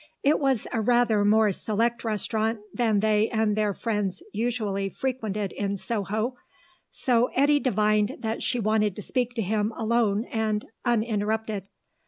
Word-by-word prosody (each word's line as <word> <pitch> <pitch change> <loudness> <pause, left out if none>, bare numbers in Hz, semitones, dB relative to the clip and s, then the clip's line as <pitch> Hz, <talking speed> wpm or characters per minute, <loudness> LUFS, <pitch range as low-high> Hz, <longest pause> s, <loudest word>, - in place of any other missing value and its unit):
It 290 +2 +4
was 270 -6 +1
a 225 - +1
rather 235 -2 +3
more 215 0 +4
select 225 +4 -1
restaurant 220 +1 -1 0.2
than 220 -4 +2
they 215 0 +2
and 220 -2 +1
their 210 -1 +1
friends 210 - -2
usually 215 -4 -1
frequented 215 -4 -3
in 200 -1 -2
Soho, 220 +4 -2 0.5
so 245 -1 +2
Eddy 290 +2 +4
divined 215 -2 +1
that 220 0 -2
she 245 - 0
wanted 215 -2 +1
to 210 - -7
speak 245 +1 -1
to 225 - 0
him 210 +2 0
alone 225 -1 +1
and 215 -2 -1 0.2
uninterrupted. 220 -3 -1
220 Hz, 145 wpm, -26 LUFS, 210-235 Hz, 0.5 s, It